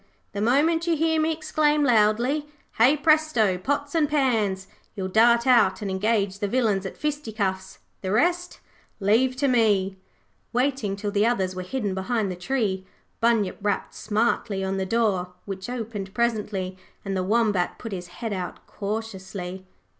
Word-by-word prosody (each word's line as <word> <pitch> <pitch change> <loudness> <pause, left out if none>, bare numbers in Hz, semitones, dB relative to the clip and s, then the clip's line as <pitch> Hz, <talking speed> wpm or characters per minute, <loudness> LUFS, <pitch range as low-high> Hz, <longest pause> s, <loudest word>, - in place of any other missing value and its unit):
The 200 - -4
moment 315 +9 +2
you 335 -2 +2
hear 320 0 +2
me 315 +1 +2
exclaim 310 -1 +1
loudly, 245 +5 +2 0.3
"Hey, 260 +7 +6
Presto! 295 - +3
Pots 285 +6 -2
and 310 -3 +2
Pans", 225 -10 +1 0.3
you 195 - -4
will 185 - -4
dart 235 +3 +5
out 230 -6 +4
and 195 - -2
engage 200 0 0
the 205 - -1
villains 205 -4 +1
at - - -10
fisticuffs. 215 -11 -3 0.2
The 190 - -3
rest 350 - +1 0.4
leave 230 +6 +3
to 280 +2 +1
me.' 205 -6 +2 0.6
Waiting 250 -5 0
till 205 0 -4
the 205 +2 +2
others 190 -6 0
were 185 - -4
hidden 205 +1 -3
behind 195 +1 -1
the - - -4
tree, 190 -1 -1 0.4
Bunyip 230 -4 +1
rapped 205 -1 -1
smartly 215 -2 -1
on 190 0 -1
the 190 0 -2
door 190 -5 0
which 195 +1 -6
opened 215 -5 -5
presently 210 -5 -1 0.3
and 195 -1 -2
the 185 - 0
Wombat 205 -2 +1
put 225 - -7
his 180 -2 -5
head 215 +5 -5
out 180 -2 -5
cautiously. 190 -3 -5
215 Hz, 160 wpm, -25 LUFS, 190-255 Hz, 0.6 s, Hey